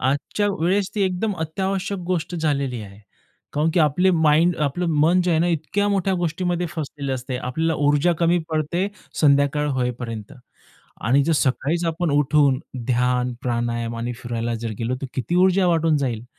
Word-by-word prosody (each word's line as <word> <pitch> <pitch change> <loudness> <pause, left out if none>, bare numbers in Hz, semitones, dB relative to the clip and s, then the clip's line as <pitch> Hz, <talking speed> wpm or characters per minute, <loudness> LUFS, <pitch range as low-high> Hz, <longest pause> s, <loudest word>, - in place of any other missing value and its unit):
आजच्या 145 +10 0
वेळेस 190 +3 +1
ती 210 - +1
एकदम 190 +2 0
अत्यावश्यक 190 +4 -2
गोष्ट 180 -1 -2
झालेली 140 -6 -1
आहे. 100 0 -12 0.5
कारण 150 +3 +1
की 180 - +4
आपलं 180 +5 +3
माइंड 160 +3 +4
आपलं 150 +5 0
मन 170 +4 +4
जे 180 - +1
आहे 160 - +3
ना, 175 - +2
इतक्या 175 +5 0
मोठ्या 195 -1 +1
गोष्टीमध्ये 175 0 -1
फसलेलं 145 -4 -4
असते, 130 0 -4
आपल्याला 160 +7 -1
ऊर्जा 145 +4 +3
कमी 170 +1 +3
पडते 160 +4 -1 0.3
संध्याकाळ 140 0 +3
होईपर्यंत 120 -4 -3 0.7
आणि 130 +6 +3
जर 165 +3 +1
सकाळीच 150 +4 0
आपण 165 0 -1
उठून 145 -2 +3 0.3
ध्यान, 125 0 +1
प्राणायाम 120 -1 -2
आणि 120 +1 -3
फिरायला 120 -1 -3
जर 115 - -2
गेलो, 120 +2 -1
तर - - -2
किती 130 +6 -2
ऊर्जा 190 0 +3
वाटून 165 -2 +2
जाईल. 120 -5 -2
150 Hz, 160 wpm, -22 LUFS, 125-175 Hz, 0.7 s, की